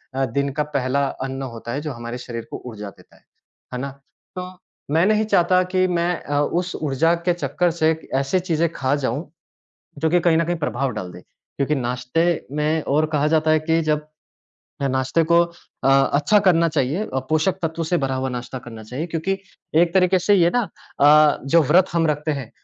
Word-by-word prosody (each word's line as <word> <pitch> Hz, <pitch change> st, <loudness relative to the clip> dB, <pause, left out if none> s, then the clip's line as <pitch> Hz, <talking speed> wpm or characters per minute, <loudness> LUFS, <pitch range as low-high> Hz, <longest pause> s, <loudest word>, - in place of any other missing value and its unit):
अ, 135 Hz, -, +1 dB
दिन 140 Hz, +3 st, -1 dB
का -, -, +3 dB
पहला 140 Hz, -1 st, 0 dB, 0.2 s
अन्न 135 Hz, 0 st, -5 dB
होता 115 Hz, +1 st, -7 dB
है 145 Hz, -, -2 dB
जो 150 Hz, -, -4 dB
हमारे 120 Hz, +1 st, -6 dB
शरीर 115 Hz, -2 st, -6 dB
को -, -, -6 dB
ऊर्जा 105 Hz, -3 st, -7 dB
देता -, -, -21 dB
है। -, -, -25 dB, 0.5 s
है 125 Hz, -, -3 dB
ना? 140 Hz, +2 st, -4 dB, 0.4 s
तो 180 Hz, 0 st, -5 dB, 0.4 s
मैं 165 Hz, +4 st, +3 dB
नहीं 215 Hz, +1 st, +2 dB
चाहता 185 Hz, -3 st, +3 dB
कि 185 Hz, 0 st, +3 dB
मैं 175 Hz, 0 st, 0 dB
अ, 145 Hz, 0 st, 0 dB
उस 175 Hz, +4 st, -1 dB
ऊर्जा 155 Hz, +3 st, +1 dB
के 175 Hz, -, +4 dB
चक्कर 170 Hz, +2 st, 0 dB
से 160 Hz, -1 st, +2 dB, 0.2 s
ऐसी 135 Hz, +7 st, +1 dB
चीज़ें 170 Hz, -2 st, 0 dB
ख़ा 135 Hz, +1 st, 0 dB
जाऊँ, 145 Hz, +2 st, -3 dB, 0.7 s
जो 160 Hz, +2 st, +1 dB
कि 175 Hz, +1 st, +3 dB
कहीं 170 Hz, -1 st, +3 dB
न 165 Hz, -, +2 dB
कहीं 175 Hz, +1 st, -1 dB
प्रभाव 140 Hz, -4 st, -2 dB
डाल 95 Hz, -5 st, -6 dB
दे। 90 Hz, -, -12 dB, 0.3 s
क्योंकि 140 Hz, +2 st, 0 dB
नाश्ते 125 Hz, +4 st, -1 dB, 0.3 s
में 155 Hz, +1 st, +1 dB
और 155 Hz, +3 st, +2 dB
कहा 150 Hz, 0 st, +2 dB
जाता 155 Hz, 0 st, +2 dB
है 155 Hz, -, +5 dB
कि 160 Hz, +1 st, +1 dB
जब 150 Hz, 0 st, 0 dB, 0.8 s
नाश्ते 130 Hz, +4 st, +1 dB
को 170 Hz, +1 st, +4 dB
अ 170 Hz, -5 st, -6 dB, 0.3 s
अच्छा 145 Hz, +9 st, +4 dB
करना 170 Hz, -2 st, +4 dB
चाहिए 150 Hz, +6 st, 0 dB
अ, 135 Hz, -, -3 dB
पोषक 160 Hz, +4 st, +1 dB
तत्व 165 Hz, 0 st, -2 dB
से 175 Hz, +2 st, 0 dB
भरा 135 Hz, -2 st, -1 dB
हुआ 130 Hz, 0 st, -2 dB
नाश्ता 125 Hz, +1 st, -5 dB
करना 115 Hz, -2 st, -10 dB
चाहिए 125 Hz, +10 st, -5 dB
क्योंकि 170 Hz, +3 st, -2 dB, 0.5 s
एक 170 Hz, -1 st, +1 dB
तरीक़े 185 Hz, 0 st, +4 dB
से 200 Hz, +3 st, +3 dB
ये 175 Hz, -2 st, +4 dB
ना 245 Hz, -, +3 dB, 0.4 s
अ, 150 Hz, +1 st, +6 dB
जो 160 Hz, +4 st, +4 dB
व्रत 175 Hz, +6 st, +4 dB
हम 165 Hz, -1 st, +2 dB
रखते 150 Hz, +1 st, -1 dB
हैं 130 Hz, -5 st, -8 dB
155 Hz, 200 wpm, -22 LUFS, 135-170 Hz, 0.8 s, अ